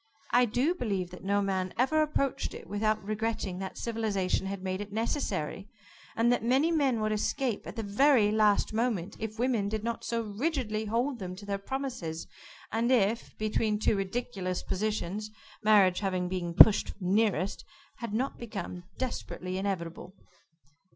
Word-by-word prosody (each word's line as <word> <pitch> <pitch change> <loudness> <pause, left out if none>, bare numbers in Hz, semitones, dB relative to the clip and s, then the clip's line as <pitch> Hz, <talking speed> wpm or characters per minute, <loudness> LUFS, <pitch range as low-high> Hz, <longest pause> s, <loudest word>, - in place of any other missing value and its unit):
I 245 +1 +5
do 250 +9 +1
believe 195 - -2
that 180 - -10
no 200 +1 +2
man 190 -2 -1
ever 290 +5 +3
approached 275 -3 -1
it - - -9
without 215 +1 0
regretting 215 -3 -2
that 190 0 -5
civilization 210 -5 -1
had 195 -1 -5
made 190 +1 -2
it 205 0 -7
necessary, 205 - -2 0.5
and 230 +2 +3
that 245 - +1
many 265 +8 +3
men 275 -8 +2
would 215 0 0
escape, 230 +2 -1
at - - -7
the 225 - -3
very 215 +1 +4
last 215 -1 +3
moment, 215 -5 -1
if 220 0 -5
women 235 -4 +1
did 215 0 -3
not 235 0 -3
so 230 -1 -1
rigidly 220 -1 -2
hold 240 +4 0
them 185 -2 -5
to 200 +2 -10
their 200 -1 -2
promises, 220 -9 -4 0.5
and 230 +3 +1
if, 230 -1 +1
between 215 0 0
two 215 - +2
ridiculous 195 -2 -3
positions, 210 +1 -2 0.3
marriage 205 -4 +5
having 185 -3 -1
been 175 -2 -3
pushed 210 +3 +8
nearest, 195 -1 +1 0.3
had 235 -3 -5
not 250 +6 -1
become 195 -6 -6
desperately 185 -7 -3
inevitable." 180 -1 -4
215 Hz, 160 wpm, -30 LUFS, 195-235 Hz, 0.5 s, pushed